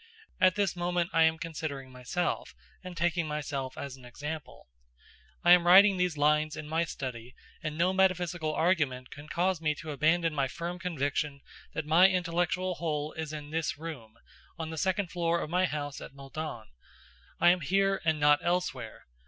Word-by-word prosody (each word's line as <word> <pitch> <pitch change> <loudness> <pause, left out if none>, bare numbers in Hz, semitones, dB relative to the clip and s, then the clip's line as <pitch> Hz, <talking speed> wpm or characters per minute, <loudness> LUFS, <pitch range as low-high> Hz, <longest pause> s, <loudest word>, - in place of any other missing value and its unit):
At 185 -1 +5
this 200 -3 0
moment 175 0 -1
I 165 0 +5
am 160 0 +2
considering 155 -5 -5
myself, 125 +8 -3 0.3
and 180 -2 -8
taking 170 -1 +1
myself 140 -3 -4
as 140 -2 -6
an 130 - -17
example. 145 +4 -7 0.8
I 175 - +6
am 175 -1 +7
writing 195 +2 +8
these 180 -3 0
lines 150 +1 +2
in 155 -1 -6
my 165 +2 0
study, 125 -5 -6 0.3
and 155 -1 -4
no 180 +3 +2
metaphysical 175 -4 +1
argument 145 -7 0
can 145 +1 -10
cause 180 +1 0
me 155 -1 +1
to 155 0 -7
abandon 160 +3 +2
my 140 -2 +1
firm 170 +6 -5
conviction 145 -4 -2 0.3
that 160 - -3
my 170 +5 +6
intellectual 180 0 0
whole 150 -2 -2
is 160 -1 -5
in 150 -1 -7
this 160 -2 -1
room, 140 -9 -8 0.4
on 160 -2 -5
the - - -5
second 190 0 0
floor 170 -1 0
of 155 - -5
my 180 +1 +3
house 145 -3 -4
at - - -10
Meudon. 140 -3 -6 0.7
I 175 - +7
am 180 0 0
here, 195 +5 +1
and 160 -2 +1
not 145 0 +5
elsewhere. 170 -10 -2
160 Hz, 175 wpm, -30 LUFS, 145-175 Hz, 0.8 s, writing